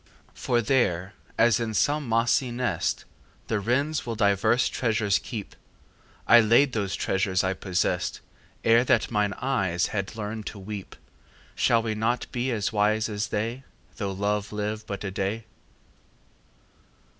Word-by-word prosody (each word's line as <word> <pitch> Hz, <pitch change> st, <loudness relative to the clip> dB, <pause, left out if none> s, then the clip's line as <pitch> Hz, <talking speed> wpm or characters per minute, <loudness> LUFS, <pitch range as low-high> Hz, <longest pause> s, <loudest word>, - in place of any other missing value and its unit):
For 120 Hz, -1 st, 0 dB
there, 100 Hz, -6 st, +1 dB, 0.2 s
as 115 Hz, -1 st, +4 dB
in 110 Hz, -2 st, -3 dB
some 145 Hz, 0 st, +1 dB
mossy 120 Hz, +3 st, +2 dB
nest 120 Hz, -8 st, -1 dB, 0.4 s
The 110 Hz, -, +1 dB
wrens 140 Hz, +9 st, 0 dB
will 115 Hz, -1 st, -4 dB
divers 105 Hz, +3 st, +3 dB
treasures 110 Hz, -4 st, +1 dB
keep, 110 Hz, -6 st, -7 dB, 0.7 s
I 120 Hz, -, +8 dB
laid 120 Hz, +4 st, +4 dB
those 100 Hz, -4 st, -1 dB
treasures 95 Hz, 0 st, 0 dB
I 95 Hz, 0 st, +1 dB
possessed 95 Hz, -1 st, -1 dB, 0.4 s
Ere 115 Hz, +1 st, +5 dB
that -, -, +2 dB
mine 105 Hz, -2 st, +1 dB
eyes 100 Hz, -11 st, 0 dB
had 100 Hz, +1 st, -3 dB
learned 110 Hz, 0 st, -5 dB
to 110 Hz, -, -6 dB
weep. 100 Hz, 0 st, -7 dB, 0.6 s
Shall 115 Hz, -1 st, +2 dB
we 110 Hz, -1 st, -1 dB
not 115 Hz, +3 st, 0 dB
be 125 Hz, +1 st, -1 dB
as 110 Hz, -3 st, -1 dB
wise 110 Hz, +1 st, +2 dB
as 105 Hz, -1 st, -2 dB
they 115 Hz, +6 st, -3 dB, 0.3 s
Though 100 Hz, -3 st, -2 dB
love 100 Hz, +1 st, -1 dB
live 105 Hz, +1 st, -4 dB
but 100 Hz, -2 st, -5 dB
a 100 Hz, -, -3 dB
day? 100 Hz, +4 st, -3 dB
110 Hz, 145 wpm, -26 LUFS, 100-120 Hz, 0.7 s, I